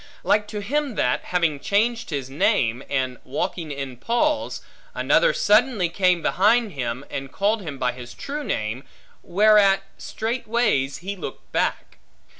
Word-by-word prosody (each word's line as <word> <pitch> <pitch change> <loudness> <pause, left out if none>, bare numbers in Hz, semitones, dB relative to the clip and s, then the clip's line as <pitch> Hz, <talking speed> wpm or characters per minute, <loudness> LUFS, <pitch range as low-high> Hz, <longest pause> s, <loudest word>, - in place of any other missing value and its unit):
Like 210 0 +2
to 210 -1 -5
him 275 +3 -1
that, 125 - 0
having 170 -5 0
changed 220 - 0
his 140 -5 -3
name, 135 - +1
and 130 -3 -1
walking 160 +3 -3
in 135 -3 -5
Paul's, 280 - 0 0.3
another - - +3
suddenly 215 - +3
came 180 -1 +2
behind 220 +3 +3
him, 125 -2 -4
and 135 0 -5
called 210 +2 +1
him 150 -7 -6
by 125 -1 0
his 125 -1 -10
true 295 +1 -5
name, 110 - -3 0.4
whereat 200 0 +4 0.2
straightways 220 - -1
he 195 +3 -4
looked 190 - -8
back. - - -2
195 Hz, 140 wpm, -23 LUFS, 135-220 Hz, 0.4 s, whereat